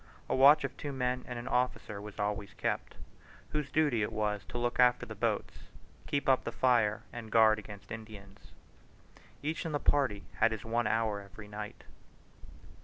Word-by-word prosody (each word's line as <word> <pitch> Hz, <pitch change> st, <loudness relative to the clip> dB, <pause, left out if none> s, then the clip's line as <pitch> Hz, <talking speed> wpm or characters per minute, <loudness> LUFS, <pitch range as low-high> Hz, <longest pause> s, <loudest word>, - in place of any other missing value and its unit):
A -, -, 0 dB
watch 140 Hz, +3 st, +7 dB
of 140 Hz, -, -3 dB
two 145 Hz, -, -4 dB
men 125 Hz, -1 st, -1 dB
and 125 Hz, -, -5 dB
an 120 Hz, +1 st, -6 dB
officer 125 Hz, -5 st, -1 dB
was 105 Hz, -1 st, -9 dB
always 105 Hz, -1 st, -2 dB
kept, -, -, -2 dB, 0.5 s
whose 150 Hz, -2 st, -2 dB
duty 145 Hz, -7 st, +2 dB
it 105 Hz, -, -1 dB
was 105 Hz, -2 st, -1 dB
to 120 Hz, -, -6 dB
look 120 Hz, 0 st, -1 dB
after 125 Hz, 0 st, +5 dB
the -, -, -7 dB
boats, -, -, -2 dB, 0.4 s
keep 140 Hz, -, -1 dB
up 130 Hz, -1 st, +4 dB
the -, -, -3 dB
fire, 115 Hz, -5 st, +2 dB
and 115 Hz, -2 st, -7 dB
guard 110 Hz, -1 st, +6 dB
against 100 Hz, -3 st, -11 dB
Indians. 105 Hz, -3 st, -10 dB, 0.9 s
Each 155 Hz, +3 st, -2 dB
in 165 Hz, -3 st, -4 dB
the 145 Hz, -, +1 dB
party 130 Hz, -11 st, +1 dB
had 115 Hz, +1 st, +4 dB
his 110 Hz, -1 st, -6 dB
one 115 Hz, 0 st, 0 dB
hour 110 Hz, -2 st, +1 dB
every 100 Hz, +1 st, -12 dB
night. 105 Hz, 0 st, -7 dB
115 Hz, 180 wpm, -32 LUFS, 105-130 Hz, 0.9 s, watch